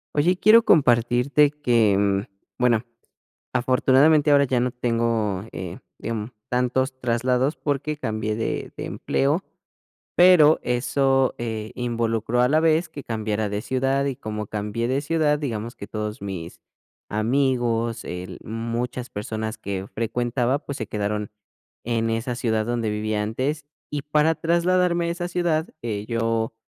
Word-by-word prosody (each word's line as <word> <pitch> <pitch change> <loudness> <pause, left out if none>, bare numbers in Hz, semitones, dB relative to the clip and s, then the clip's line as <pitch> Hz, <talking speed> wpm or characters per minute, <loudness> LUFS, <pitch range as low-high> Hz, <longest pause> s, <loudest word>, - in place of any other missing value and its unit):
Oye, 170 +5 +3
quiero 215 +5 +6
compartirte 125 +1 +4
que, 105 -8 +2 0.3
bueno, 120 -3 +3 0.7
afortunadamente 135 +4 +4
ahora 140 -1 +6
ya 125 -2 +1
no 125 +1 +1
tengo, 115 -5 0
eh 90 -2 -6 0.2
digam 110 0 -4 0.2
tantos 125 +2 0
traslados 125 +4 +1
porque 145 +1 -2
cambié 110 -5 -2
de 115 - -3
de - - -5
empleo, 145 +7 0 0.7
pero 175 -4 +7
eso, 135 +2 +1
eh, 110 -2 -4
involucró 115 -1 -1
a 125 - +5
la 155 +3 +3
vez 165 +1 +2
que 145 - -9
cambiara 110 -2 -2
de 105 +1 -3
ciudad 135 +2 0
y 140 - -1
como 105 -2 -5
cambié 105 +3 -3
de 130 +3 0
ciudad, 150 -1 +1
digamos 115 -5 -4
que 100 - -9
todos 105 -1 -5
mis 90 -4 -6 0.5
amigos, 120 0 0
el 90 +1 -6
muchas 115 +2 -4
personas 110 +1 -4
que 100 -2 -5
frecuentaba, 120 +4 0
pues 140 -2 -6
se 110 - -4
quedaron 105 0 -2 0.5
en 115 -1 0
esa 115 +2 -2
ciudad 110 -3 0
donde 120 -2 -1
vivía 105 0 -1
antes, 135 +7 -2 0.2
y 145 -1 -3
para 150 +2 +2
trasladarme 170 +1 +2
a - - -1
esa 175 +1 -3
ciudad, 170 -3 0
eh, 105 -3 -3
yo 115 0 -1
120 Hz, 140 wpm, -24 LUFS, 110-140 Hz, 0.7 s, pero